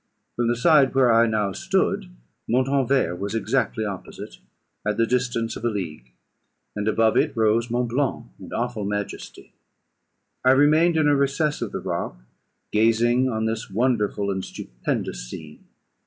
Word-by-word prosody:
From 120 -1 0
the 120 - +2
side 135 0 +4
where 125 -3 +5
I 115 +1 +5
now 105 -3 0
stood 85 - -1 0.4
Montanvert 130 -7 +1
was 100 +3 -3
exactly 115 0 0
opposite, 100 -3 -8 0.4
at 105 0 -1
the 115 - +3
distance 120 -1 -1
of - - -8
a 120 - +2
league; 80 - -6 0.6
and 105 0 -3
above 110 0 +2
it - - +1
rose 110 +2 +2
Mont 120 0 -1
Blanc, 135 +3 -1
in - - -11
awful 120 -2 -2
majesty. 105 0 -5 0.9
I 130 +1 +6
remained 155 +4 +4
in 155 -2 +3
a 145 - +4
recess 140 +2 0
of - - -3
the - - -4
rock, - - -3 0.5
gazing 115 +4 +3
on 110 -2 -1
this 110 +1 -3
wonderful 105 -3 0
and 95 -1 -3
stupendous - - -5
scene. 75 +2 -10
115 Hz, 155 wpm, -23 LUFS, 105-130 Hz, 0.9 s, I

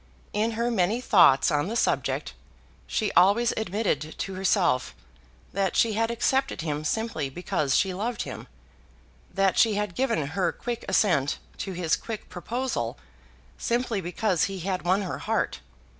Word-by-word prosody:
In 220 +2 0
her 235 +2 0
many 205 +2 +1
thoughts 175 - +5
on 145 +2 +1
the 225 - -3
subject, - - 0 0.5
she 215 -3 0
always 205 +6 +4
admitted 190 -8 -1
to 195 - -4
herself 185 - +1 0.6
that 195 -1 0
she 225 -2 +3
had 225 +2 +1
accepted 265 -1 0
him 150 -2 -3
simply 160 -5 -1
because 145 -2 -1
she 190 -2 +2
loved 225 +6 -2
him; - - -8 0.8
that 195 -1 +2
she 220 -3 +4
had 210 -3 -2
given 170 - 0
her 180 -2 +1
quick 240 +5 -5
assent 170 -8 +2 0.2
to 195 - -4
his 170 -3 +1
quick 225 -2 -7
proposal 190 - -3 0.6
simply 235 -3 0
because 180 0 0
he 195 -2 -5
had 185 +1 -2
won 185 +3 +1
her 185 - -4
heart. - - -1
195 Hz, 150 wpm, -26 LUFS, 175-225 Hz, 0.8 s, thoughts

